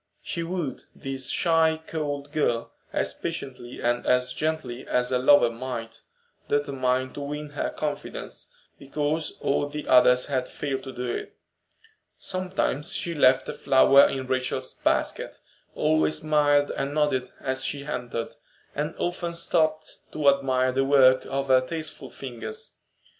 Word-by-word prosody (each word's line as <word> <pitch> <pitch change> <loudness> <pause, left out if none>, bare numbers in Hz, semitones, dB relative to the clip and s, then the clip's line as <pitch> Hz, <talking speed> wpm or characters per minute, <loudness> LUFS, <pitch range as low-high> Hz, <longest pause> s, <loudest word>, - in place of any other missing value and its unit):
She 170 - -3
wooed 165 -5 -4
this 135 -1 -5
shy, 160 -2 +3
cold 145 -2 -4
girl 120 -7 0 0.2
as - - -1
patiently 125 -2 -6
and 120 0 +1
as 125 0 +2
gently 155 -6 -3
as 125 0 +1
a 125 - +2
lover 130 -2 +6
might, 115 -2 -6 0.5
determined 130 -3 0
to 145 - -6
win 150 +1 -5
her 145 - -2
confidence, 150 -1 -5 0.3
because 150 +3 -2
all 145 +1 +1
the 150 +1 -6
others 125 0 +6
had 130 -3 -1
failed 135 -2 -3
to 130 - -6
do 125 0 -4
it. 120 - -5 0.8
Sometimes 185 -6 -2
she 170 - -2
left 130 -4 +4
a - - -3
flower 135 0 +6
in 135 -1 -3
Rachel's 130 0 -1
basket, - - -1 0.4
always 155 +1 +2
smiled 145 -2 +3
and 140 +2 -2
nodded 145 -4 +1
as 130 0 -2
she 140 -1 -3
entered, 120 -4 -4 0.4
and 150 +3 -3
often 175 -1 -2
stopped 155 -2 0
to 150 -2 +4
admire 130 -2 +2
the 135 +1 +1
work 130 -2 +5
of 135 0 -2
her 130 -1 +6
tasteful 160 +4 -6
fingers. 135 - -7
140 Hz, 140 wpm, -26 LUFS, 130-150 Hz, 0.8 s, lover